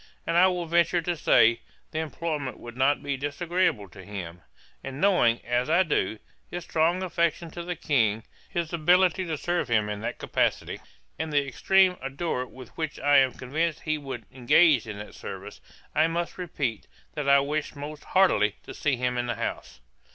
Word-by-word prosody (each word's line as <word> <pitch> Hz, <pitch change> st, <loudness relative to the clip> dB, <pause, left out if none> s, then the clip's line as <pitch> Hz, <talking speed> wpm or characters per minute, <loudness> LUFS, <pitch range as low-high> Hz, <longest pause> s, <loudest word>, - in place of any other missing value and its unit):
And 165 Hz, -, -1 dB
I 180 Hz, +2 st, +7 dB
will 180 Hz, -2 st, -1 dB
venture 170 Hz, +1 st, +2 dB
to 175 Hz, +1 st, -1 dB
say, 115 Hz, -6 st, +4 dB, 0.3 s
the 155 Hz, -, -2 dB
employment 155 Hz, -3 st, -3 dB
would 120 Hz, 0 st, -10 dB
not 135 Hz, +4 st, +2 dB
be 140 Hz, -1 st, -2 dB
disagreeable 145 Hz, -, 0 dB
to 95 Hz, +2 st, -12 dB
him; 90 Hz, -4 st, -7 dB, 0.4 s
and 135 Hz, 0 st, -6 dB
knowing, 155 Hz, -12 st, +3 dB
as 120 Hz, +3 st, 0 dB
I 175 Hz, +4 st, +5 dB
do, 110 Hz, -, 0 dB, 0.3 s
his 175 Hz, 0 st, -5 dB
strong 170 Hz, +3 st, +1 dB
affection 170 Hz, -2 st, -1 dB
to 175 Hz, -, -6 dB
the 175 Hz, +1 st, -4 dB
King, 115 Hz, -9 st, +1 dB, 0.3 s
his 170 Hz, -1 st, -3 dB
ability 180 Hz, +3 st, +3 dB
to 160 Hz, -2 st, -2 dB
serve 175 Hz, +3 st, -1 dB
him 110 Hz, -3 st, +1 dB
in 105 Hz, 0 st, -4 dB
that 120 Hz, +2 st, -4 dB
capacity, -, -, -1 dB, 0.4 s
and 160 Hz, -, -3 dB
the 145 Hz, -1 st, +2 dB
extreme 190 Hz, +6 st, +3 dB
ardour 135 Hz, -1 st, -3 dB
with 130 Hz, -2 st, -12 dB
which 155 Hz, -2 st, -4 dB
I 145 Hz, 0 st, +4 dB
am 130 Hz, -2 st, +4 dB
convinced 155 Hz, +5 st, -2 dB
he 155 Hz, -1 st, -1 dB
would 135 Hz, -2 st, -7 dB
engage 130 Hz, +1 st, +4 dB
in 105 Hz, -1 st, -6 dB
that 105 Hz, +1 st, -9 dB
service, -, -, -8 dB, 0.3 s
I 155 Hz, +2 st, +4 dB
must 170 Hz, +2 st, -3 dB
repeat, 140 Hz, -10 st, -3 dB, 0.3 s
that 150 Hz, -3 st, -2 dB
I 140 Hz, 0 st, +7 dB
wish 150 Hz, +2 st, -2 dB
most 145 Hz, +1 st, -7 dB
heartily 110 Hz, -, +3 dB
to -, -, -9 dB
see 145 Hz, -3 st, 0 dB
him 125 Hz, 0 st, -1 dB
in 120 Hz, -, -2 dB
the 120 Hz, -, -1 dB
House. 65 Hz, -, -5 dB
145 Hz, 185 wpm, -26 LUFS, 125-170 Hz, 0.4 s, I